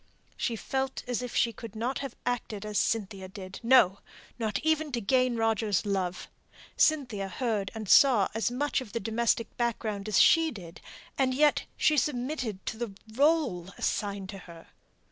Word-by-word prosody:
She 235 - -2
felt 265 +4 -3
as 245 -1 -1
if 250 -1 -6
she 230 -1 +2
could 225 0 -10
not 240 +5 -2
have 275 -3 -6
acted 225 -4 -3
as 210 -2 0
Cynthia 195 -4 -1
did; 190 0 -9
no, 230 -6 +5 0.4
not 215 -3 -1
even 315 -1 +1
to 240 - 0
gain 255 +3 +2
Roger's 225 -3 +1
love. 190 -3 -2 0.5
Cynthia 250 -11 +2
heard 210 -3 -2
and 220 -2 -6
saw 235 -4 +6
as 225 +1 0
much 275 +3 -1
of 225 -6 -10
the 230 - -1
domestic 225 +1 0
background 220 -4 -2
as 215 - +3
she 325 -1 +6
did, 180 - -10 0.4
and 260 -1 +2
yet 295 +2 +3
she 305 - +3
submitted 255 -7 -2
to 220 - -4
the 230 -4 -5 0.2
rÖle 245 - +1
assigned 200 -2 -2
to 195 -1 -7
her! 170 -2 -13
225 Hz, 165 wpm, -29 LUFS, 200-255 Hz, 0.5 s, saw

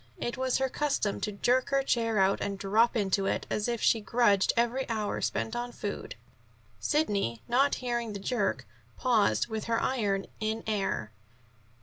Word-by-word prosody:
It 240 - -3
was 260 0 0
her 265 - +1
custom 275 -7 -1
to 210 - -1
jerk 245 +5 +1
her 275 0 +2
chair 230 -4 +1
out 195 0 +3
and 200 -1 -2
drop 215 +5 +2
into 195 -2 +1
it, - - -1
as 210 - 0
if 235 -2 -2
she 225 - +4
grudged 205 -3 +3
every 240 +3 +1
hour 215 -2 -2
spent 225 - -1
on 240 0 -3
food. - - -5 0.6
Sidney, 200 - 0
not 270 +4 +3
hearing 235 -3 -2
the 200 - -5
jerk, 195 - -1 0.3
paused 230 -5 +2
with 220 -2 -4
her 230 0 +1
iron 205 -7 0
in 220 +1 -2
air. 195 - -1
225 Hz, 165 wpm, -29 LUFS, 200-245 Hz, 0.6 s, she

